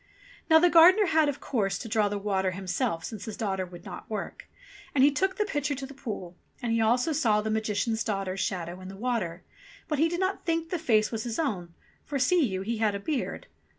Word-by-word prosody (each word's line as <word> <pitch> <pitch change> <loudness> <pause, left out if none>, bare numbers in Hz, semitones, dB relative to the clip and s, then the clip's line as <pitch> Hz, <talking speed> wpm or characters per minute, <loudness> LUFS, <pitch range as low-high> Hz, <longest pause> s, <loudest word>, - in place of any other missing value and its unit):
Now 320 - +8
the 345 +2 +6
gardener 365 +5 +7
had, 315 -4 +3
of 285 - -4
course, 200 -7 -1
to 235 - -7
draw 215 -2 +2
the 205 - -2
water 195 -2 0
himself, 180 -3 -2
since 215 -4 -7
his 220 - -6
daughter 190 -4 -2
would 175 0 -12
not - - -9
work. 220 - -5 0.5
And 265 - +5
he 285 - +6
took 380 +6 0
the 420 - +1
pitcher 290 -6 -1
to 270 0 -5
the 275 - -10
pool; 210 -10 -6 0.2
and 240 -2 -2
he 230 - +2
also 245 +8 +2
saw 240 -9 +2
the 215 +1 -2
Magician's 220 +1 0
daughter's 195 -3 -2
shadow 180 -1 -3
in 185 - -9
the 195 +1 -9
water; 210 -7 -2 0.4
but 300 -3 -1
he 325 +2 +4
did 345 +1 -2
not 375 +1 -1
think 330 -1 -1
the 355 - -1
face 220 -9 +2
was 225 -2 -2
his 235 -2 -4
own, 180 - -2 0.3
for, 285 - -3
see 320 +6 +3
you, 190 -6 -1
he 230 +3 -2
had 215 -2 +2
a - - -3
beard 280 +5 -3
225 Hz, 230 wpm, -28 LUFS, 195-290 Hz, 0.5 s, Now